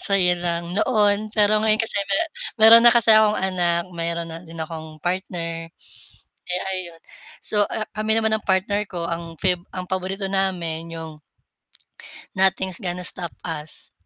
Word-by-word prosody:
saya 190 -3 +3
lang 170 0 -2
noon 210 0 +2
pero 210 0 +3
ngayon 215 0 +3
kasi 225 -2 -1
me 195 - +1 0.4
meron 225 +1 +10
na 240 - +8
kasi 230 -2 +5
akong 215 -1 +5
anak, 175 -2 0
meron 170 0 -3
na 165 - -8
din 165 0 -12
akong 160 -1 -7
partner. 170 -2 -3 0.8
Eh, 180 +1 -1
ayun. 175 -3 -6 0.4
So 210 -1 +2
a 215 - -3
kami 215 +1 +1
naman 220 -1 +1
ng 215 - -11
partner 195 +2 +1
ko, 175 -2 -5
ang 165 -1 -5
fave 180 -2 +1 0.2
ang 185 - -4
paborito 190 +1 -3
namin 175 -4 -1
yung 160 -2 -8 1.1
Nothing's 190 -1 +2
gonna 180 -1 -4
stop 175 -1 0
us. 155 -3 -6
185 Hz, 155 wpm, -22 LUFS, 170-205 Hz, 1.1 s, meron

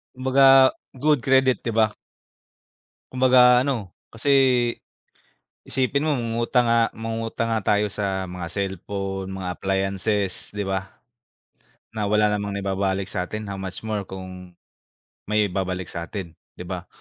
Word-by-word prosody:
Kumbaga 135 0 +6 0.2
good 150 +1 +2
credit, 130 -1 +4
di 115 - 0
ba? 110 -1 +3 1.2
Kumbaga 125 -1 +5
ano 140 - 0 0.4
kasi, 115 +5 -3 1.3
isipin 135 +2 0
mo 155 - +1
mangungutang 120 +1 +1
nga 115 0 +4
mangungutang 115 0 -3
nga 110 - -1
tayo 105 +1 +2
sa 95 -2 -3
mga 90 -1 -6
cellphone, 95 0 -4
mga 95 -1 -5
appliances, 95 +1 -1
di 105 -1 -4
ba? 95 0 -3 1.0
Na 105 -2 -2
wala 105 0 +3
namang 105 -1 -2
naibabalik 95 0 -1
sa'tin, 110 +4 -4
how 100 - -5
much 95 +1 -6
more 105 -3 -3
kung 90 -1 -9 0.7
may 105 -2 +1
babalik 90 -1 -3
sa 85 0 -5
atin, 95 -5 -6 0.2
di - - -8
ba? - - -6
105 Hz, 130 wpm, -23 LUFS, 95-115 Hz, 1.3 s, Kumbaga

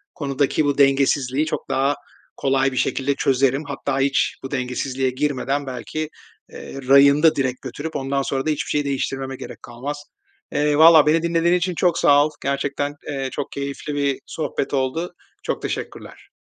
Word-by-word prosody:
konudaki 140 +1 0
bu 145 -1 0
dengesizliği 135 0 +3
çok - - -4
daha 140 +2 +1 0.4
kolay 135 0 +1
bir 130 - -6
şekilde 135 +2 0
çözerim. 135 +2 +1
Hatta 135 -1 -2
hiç 135 0 +1
bu 135 - -6
dengesizliğe 130 0 -1
girmeden 140 +1 -1
belki, 150 +5 -4 0.4
eee, 135 - -8
rayında 140 +3 +6
direkt 130 -2 -1
götürüp 145 +5 -6
ondan 135 +1 -1
sonra 135 0 -2
da - - 0
hiçbir 150 +1 -2
şeyi 145 -1 0
değiştirmeme 135 -1 -2
gerek - - -10
kalmaz. 135 +5 -6 0.5
Eee, 150 0 +1
vallaha 160 -1 +8
beni 160 +2 +4
dinlediğin 170 +1 +2
için 180 0 -1
çok 175 +1 +2
sağ 145 0 +5
ol. 155 - -2
Gerçekten, 140 +1 -1
eee, 135 -2 -3
çok 145 - -5
keyifli 140 +1 -5
bir 140 -1 0
sohbet 145 -3 -3
oldu. 140 +7 -1 0.3
Çok - - -3
teşekkürler. - - -6
140 Hz, 160 wpm, -22 LUFS, 135-150 Hz, 0.5 s, vallaha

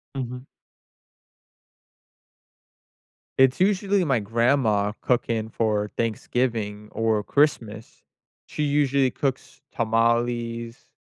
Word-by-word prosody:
Mhm. 125 -1 -5 2.9
It's 130 0 +4
usually 195 0 +2
my 135 -7 +1
grandma 115 -1 +1
cooking 115 -3 0
for 105 -2 -1
Thanksgiving 110 -2 -2
or 110 -2 0
Christmas. 115 -7 -1 0.4
She 150 - -4
usually 140 -2 +2
cooks 135 0 -4
tamales, 115 0 -1
120 Hz, 75 wpm, -24 LUFS, 110-135 Hz, 2.9 s, It's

